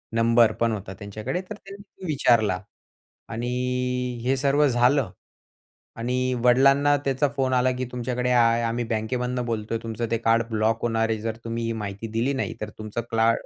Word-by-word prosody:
Number 115 0 +5
पण 115 0 +2
होते 100 -3 -5
त्यांच्याकडे, 105 - -4
तर 210 - -5
त्यांनी 200 -1 -13
विचारला 115 - +3 0.7
आणि 115 +2 -3 0.7
हे 130 +2 +2
सर्व 140 +2 +3
झालं 125 -2 +2 0.9
आणि 125 +2 0
वडिलांना 135 +3 +5
त्यांचा 135 +1 +2
फोन 130 -1 +1
आला 130 0 +3
की 130 - -2
"तुमच्याकडे 125 0 -2
आय 115 -1 +4
आम्ही 115 +1 -1
बँकेमधून 125 +3 -2
बोलतोय. 115 -1 -2
तुमचं 115 0 -4
ते 115 - +2
कार्ड 115 0 +2
ब्लॉक 110 0 +1
होणार 115 -1 +1
आहे. 110 - 0
जर 110 0 -3
तुम्ही 115 0 -3
ही 115 - -1
माहिती 105 0 -5
दिली 115 +5 0
नाही, 135 - -2
तर 105 - -3
तुमचं 110 +2 -4
क्ला 115 0 +3
115 Hz, 165 wpm, -25 LUFS, 115-130 Hz, 0.9 s, Number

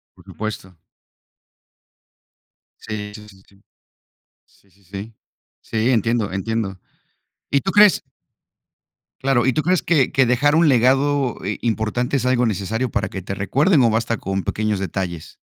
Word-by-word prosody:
Por - - -20
supuesto. 100 -4 -7 2.0
Sí, 105 -1 -6
sí, 105 -1 -11
sí, 95 -2 -18
sí, 100 - -23 0.9
sí, 100 - -30
sí, 100 +2 -28
sí, 100 +4 -9 0.5
sí, 115 +2 -1
entiendo, 115 -2 +1
entiendo, 95 0 -3 0.7
¿y 140 - +3
tú 190 - -2
crees? 210 -2 +6 1.2
Claro, 130 -3 +2
¿y 130 - +2
tú 155 - +1
crees 180 +3 +2
que 150 -7 +2
que 135 - +3
dejar 135 +5 +2
un 165 0 +4
legado, 135 +1 +2
eh, 105 +2 -2
importante 115 +3 -1
es 125 - -2
algo 125 -1 +2
necesario 110 +4 -2
para - - -1
que 95 - -6
te 95 +2 -5
recuerden 140 - +2
o 115 - +4
basta 115 +1 0
con 95 -1 -3
pequeños 105 +2 -1
detalles? 90 -3 -5
115 Hz, 145 wpm, -21 LUFS, 100-130 Hz, 2.0 s, crees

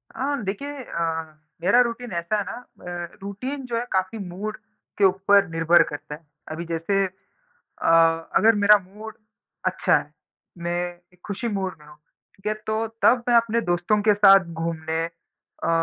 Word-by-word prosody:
अ, 280 +2 -1
देखिए 280 +10 -4
अ, 160 -5 -3 0.3
मेरा 200 +7 +5
रूटीन 240 -1 -2
ऐसा 170 +5 -1
है 205 - 0
ना 245 - -7 0.2
ब 175 -1 -7
रूटीन 255 +8 -5
जो 235 -2 -2
है 235 - -2
काफ़ी 190 +3 0
मूड 210 +5 -5 0.4
के 205 - +1
ऊपर 195 +1 +4
निर्भर 165 +1 +4
करता 150 0 -7
है। 150 - -17 0.3
अभी 165 +2 -5
जैसे 170 +4 0
अ, 190 0 -13 1.0
अगर 225 +3 +6
मेरा 205 0 +6
मूड 215 +3 -10 0.5
अच्छा - - +3
है, - - -10 0.5
मैं 170 0 -3 0.4
एक 180 - -26
खुशी 210 +4 -3
मूड 195 -3 -3
में 150 - -17
हूँ, 150 0 -15 0.4
ठीक 195 - -17
है? 215 - +1
तो 215 +1 -2 0.2
तब 245 0 +5
मैं 240 - +4
अपने 230 0 +3
दोस्तों 175 +5 +2
के 210 - +7
साथ 195 -2 +7 0.2
घूमने 160 0 -2 0.6
अ, - - 0
195 Hz, 165 wpm, -24 LUFS, 170-220 Hz, 1.0 s, के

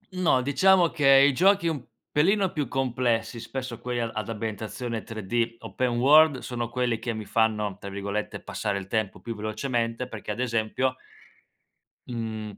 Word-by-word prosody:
No, 165 -8 +2
diciamo 180 +5 +4
che 150 -4 0 0.2
i 145 - +2
giochi 190 +3 +4
un 145 -6 -2 0.3
pelino 190 +5 +3
più 145 -5 -2
complessi, 120 -3 -1
spesso 130 -1 -6
quelli 125 -1 -3
a 115 -1 -2
ad 110 0 -4
ambientazione 110 +2 -4
3D, 115 +1 -2
open 125 -2 -1
world, 150 +2 +6
sono 120 -2 -4
quelli 120 -2 -1
che 115 +1 -3
mi 110 -1 -6
fanno, 105 -2 +1
tra 100 - -7
virgolette, 100 +2 -4
"passare 100 - -2
il 95 - -5
tempo" 110 0 -2
più 115 - -5
velocemente 115 +3 -2
perché, 110 -3 -9
ad 105 - -3
esempio 125 +2 0 1.1
mhmm, 110 -3 -5
120 Hz, 160 wpm, -26 LUFS, 110-130 Hz, 1.1 s, world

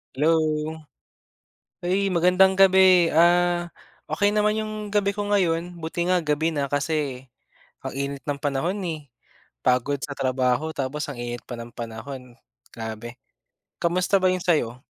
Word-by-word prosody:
Hello! 150 +4 +2 1.5
Ay 190 +3 +1
magandang 180 +2 +4
gabi, 190 -2 +6
ah, 175 +1 +3 0.4
okey 205 0 +1
naman 210 0 +2
'yung 215 0 -3 0.2
gabi 200 -1 +2
ko 205 0 -4
ngayon. 180 -4 0
Buti 170 +2 -2
nga 180 -1 +2
gabi 155 +2 0
na 140 -2 -2
kasi 145 -3 -2 0.6
ang - - -4
init 140 0 -4
ng 145 -1 -2
panahon 145 +8 -1
eh, 155 -4 -6 0.6
pagod 130 +3 +2
sa 140 - -4
trabaho 130 +3 0
tapos 140 +2 -3
ang 135 - -8
init 120 -1 -5
pa 125 - -6
ng 120 0 -9
panahon, 120 +2 -8 0.4
grabe. 115 +2 -7 0.6
Kamusta 180 +3 +2
ba 185 - +4
'yung 180 -1 -3
sa'yo? 125 -8 0
160 Hz, 140 wpm, -24 LUFS, 130-180 Hz, 1.5 s, gabi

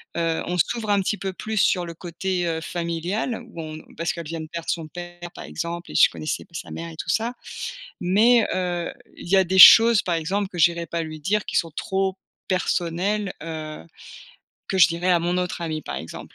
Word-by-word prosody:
Heu, 165 -1 0
on 180 - -2
s'ouvre 215 +4 0
un 200 - +3
petit 205 +2 -1
peu 190 -1 -4
plus 220 +4 -5
sur 185 -2 +3
le 170 - -8
côté, 180 +1 -3
heu, 160 -1 -2
familial 175 +8 -3
ou 165 - -8
on 155 0 -7 0.2
parce 165 +2 -1
qu'elle 170 -2 -7
vient 165 +1 -5
de 160 - -5
perdre 170 +1 -6
son 165 -2 -2
père, 175 +1 -9
par - - -9
exemple 170 +1 -5
et - - -9
je - - +7
connaissais 155 - -4
pas - - -31
sa 160 - -6
mère 165 0 -6
et - - -11
tout - - -6
ça. 230 +2 0 0.7
Mais 215 +6 +4
heu, 175 -2 -2 0.3
il - - -10
y 195 - +4
a 190 - +5
des 190 +2 0
choses, 225 +2 +10
par 175 - -1
exemple, 190 +5 -1
que 180 - -11
j'irais 170 0 +3
pas 170 +2 -2
lui 155 -1 -7
dire 205 +6 0
qui - - -3
sont 165 - +1
trop 190 +4 -1 0.3
personnelles, 185 +2 0
heu, 155 -2 -6 0.8
que 190 - -1
je 185 - +8
dirais 170 +2 -1
à 175 -1 +4
mon 175 +2 0
autre 180 -1 -2
amie, 155 -2 -3
par - - -6
exemple. 80 - -8
175 Hz, 220 wpm, -23 LUFS, 165-190 Hz, 0.8 s, choses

